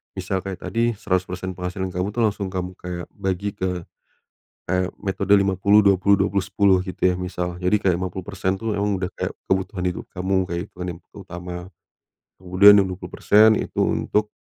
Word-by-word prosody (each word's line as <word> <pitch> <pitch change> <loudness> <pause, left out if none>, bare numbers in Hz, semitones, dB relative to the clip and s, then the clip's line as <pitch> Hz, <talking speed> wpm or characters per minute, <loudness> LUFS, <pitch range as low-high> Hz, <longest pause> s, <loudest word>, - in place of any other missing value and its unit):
misal 95 0 -2
kayak 95 -1 -6
tadi 115 0 0
100% 95 -1 -2
penghasilan 90 +1 -4
kamu 90 +3 -2
tuh 120 - +1
langsung 105 -2 0
kamu 90 -1 -4
kayak 90 -1 -6
bagi 100 0 -2
ke, 90 -2 -3 0.9
kayak 90 +1 0
metode 100 0 0
50-20-20-10 100 0 +3
gitu 95 - -8
ya 90 - -1
misal 90 -1 -4
jadi 90 +3 +1
kayak 95 -4 +2
50% 95 +1 -3
tuh 110 -2 -2
emang 100 0 0
udah 90 - -1
kayak - - -3 0.2
kebutuhan 95 0 -1
hidup 90 - -6
kamu, 95 +1 0
kayak 85 +1 -3
kebutuhan 90 0 -7
yang - - -21 0.2
utama, 90 -2 -7 0.8
kemudian 95 +3 +7
yang 100 - +4
20% 105 +3 +3
itu - - -3
untuk, 105 0 +1
95 Hz, 155 wpm, -22 LUFS, 90-100 Hz, 0.9 s, kemudian